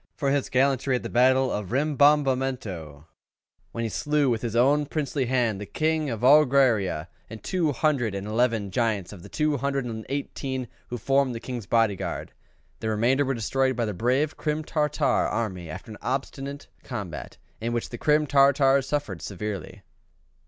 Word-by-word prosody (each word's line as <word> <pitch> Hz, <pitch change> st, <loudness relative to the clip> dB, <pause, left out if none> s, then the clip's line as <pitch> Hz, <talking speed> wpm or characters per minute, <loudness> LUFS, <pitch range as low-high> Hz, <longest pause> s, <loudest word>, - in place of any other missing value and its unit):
for 140 Hz, -3 st, 0 dB
his 140 Hz, -1 st, 0 dB
gallantry 135 Hz, 0 st, +2 dB
at 125 Hz, -, -3 dB
the -, -, -4 dB
battle 130 Hz, +1 st, +4 dB
of 105 Hz, -3 st, -4 dB
Rimbombamento, 135 Hz, -, +1 dB, 0.7 s
when 115 Hz, -, -4 dB
he 115 Hz, -, -1 dB
slew 150 Hz, 0 st, +1 dB
with 115 Hz, -2 st, -1 dB
his 115 Hz, -2 st, -3 dB
own 140 Hz, +5 st, +3 dB
princely 140 Hz, -3 st, -2 dB
hand 120 Hz, -5 st, 0 dB
the 105 Hz, -, -6 dB
King 155 Hz, -1 st, 0 dB
of 115 Hz, -4 st, -4 dB
Ograria 125 Hz, -, +4 dB, 0.2 s
and 110 Hz, -1 st, -9 dB
two 175 Hz, -5 st, 0 dB
hundred 130 Hz, -6 st, 0 dB
and 100 Hz, 0 st, -4 dB
eleven 110 Hz, -2 st, 0 dB
giants 105 Hz, -4 st, -1 dB
of 95 Hz, -, -11 dB
the -, -, -12 dB
two 150 Hz, -1 st, 0 dB
hundred 140 Hz, -1 st, -1 dB
and 110 Hz, -2 st, -5 dB
eighteen 135 Hz, -2 st, -3 dB, 0.2 s
who 120 Hz, -, -4 dB
formed 135 Hz, +2 st, +1 dB
the -, -, -4 dB
King's 120 Hz, -4 st, -6 dB
body 115 Hz, -2 st, +3 dB
guard. -, -, -5 dB, 0.5 s
The 110 Hz, -, -2 dB
remainder 120 Hz, +6 st, +2 dB
were 135 Hz, -1 st, -1 dB
destroyed 130 Hz, +4 st, 0 dB
by 120 Hz, -1 st, 0 dB
the 105 Hz, -, -3 dB
brave 130 Hz, -, +1 dB
Crim 155 Hz, 0 st, -2 dB
Tartar 150 Hz, -2 st, -1 dB
army 90 Hz, -7 st, 0 dB
after 110 Hz, +8 st, -8 dB
an 105 Hz, -, -8 dB
obstinate 135 Hz, +1 st, -4 dB, 0.2 s
combat, -, -, -6 dB, 0.2 s
in 115 Hz, +1 st, -2 dB
which 120 Hz, -1 st, -2 dB
the 120 Hz, -, -7 dB
Crim 150 Hz, 0 st, +3 dB
Tartars 140 Hz, -1 st, +4 dB
suffered 140 Hz, -, -2 dB
severely." 100 Hz, -2 st, -6 dB
130 Hz, 175 wpm, -26 LUFS, 110-140 Hz, 0.7 s, battle